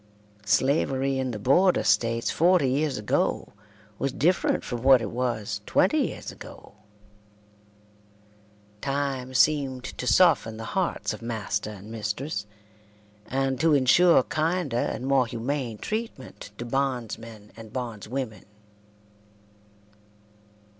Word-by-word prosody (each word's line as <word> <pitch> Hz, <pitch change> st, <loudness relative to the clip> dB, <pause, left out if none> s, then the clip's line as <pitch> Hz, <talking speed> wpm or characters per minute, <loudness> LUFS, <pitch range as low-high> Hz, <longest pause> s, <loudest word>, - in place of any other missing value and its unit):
Slavery 135 Hz, +3 st, +1 dB
in 130 Hz, -1 st, -1 dB
the 115 Hz, -, -4 dB
Border 175 Hz, -, +3 dB
States 115 Hz, 0 st, +1 dB
forty 170 Hz, -3 st, +3 dB
years 140 Hz, +1 st, 0 dB
ago 105 Hz, 0 st, -1 dB, 0.5 s
was 135 Hz, +1 st, -1 dB
different 170 Hz, +8 st, +1 dB
from 120 Hz, -2 st, -5 dB
what 130 Hz, 0 st, +6 dB
it 110 Hz, -3 st, -4 dB
was 120 Hz, -4 st, -2 dB
twenty -, -, +3 dB
years -, -, -7 dB
ago. -, -, -13 dB, 2.1 s
Time 135 Hz, -2 st, -2 dB
seemed 135 Hz, -3 st, +2 dB
to 125 Hz, -, -6 dB
soften 115 Hz, -12 st, +4 dB
the 115 Hz, -, -6 dB
hearts 185 Hz, -10 st, -1 dB
of 110 Hz, -, -9 dB
master 105 Hz, -3 st, -3 dB
and 105 Hz, +1 st, -10 dB
mistress, 110 Hz, +1 st, -4 dB, 0.8 s
and 135 Hz, -1 st, -1 dB
to 160 Hz, -1 st, +4 dB
insure 145 Hz, +3 st, +5 dB
kinder 160 Hz, -2 st, -1 dB
and 125 Hz, +1 st, -2 dB
more 135 Hz, -2 st, +3 dB
humane 120 Hz, 0 st, -3 dB
treatment 215 Hz, -, -6 dB
to 120 Hz, -, -5 dB
bondsmen 115 Hz, -5 st, -3 dB
and 110 Hz, -1 st, -11 dB
bondswomen. 115 Hz, -2 st, -5 dB
130 Hz, 115 wpm, -26 LUFS, 115-140 Hz, 2.1 s, what